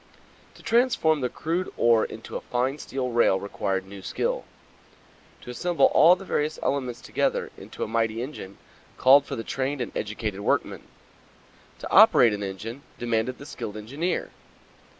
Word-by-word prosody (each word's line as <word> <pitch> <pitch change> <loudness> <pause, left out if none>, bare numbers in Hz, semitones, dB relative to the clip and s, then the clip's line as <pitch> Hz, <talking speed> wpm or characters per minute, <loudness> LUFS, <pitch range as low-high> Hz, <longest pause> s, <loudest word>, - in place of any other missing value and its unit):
To - - -16
transform 230 - +2
the 125 - 0
crude 170 +7 -3
ore 115 -2 +4
into - - -9
a - - -3
fine 130 +4 -2
steel 130 -3 -4
rail 115 -5 +3
required 95 -1 -3
new 100 0 -10
skill. - - -2 1.0
To 125 - -8
assemble 175 +7 +2
all 170 +4 +7
the 195 +1 -11
various 155 -3 -1
elements 130 -4 -2
together - - -1
into - - -7
a - - -3
mighty 115 +1 -1
engine 110 -8 -8 0.4
called 135 +2 +6
for - - -4
the 115 - -5
trained 135 +3 -2
and 125 - -5
educated 105 -1 -3
workman. 100 - -1 1.0
To - - -8
operate 115 -3 +7
an 105 - -4
engine 105 +6 -6 0.2
demanded 120 +1 -1
the 140 - -11
skilled 105 -6 -7
engineer. 140 +12 -3
125 Hz, 155 wpm, -25 LUFS, 110-145 Hz, 1.0 s, all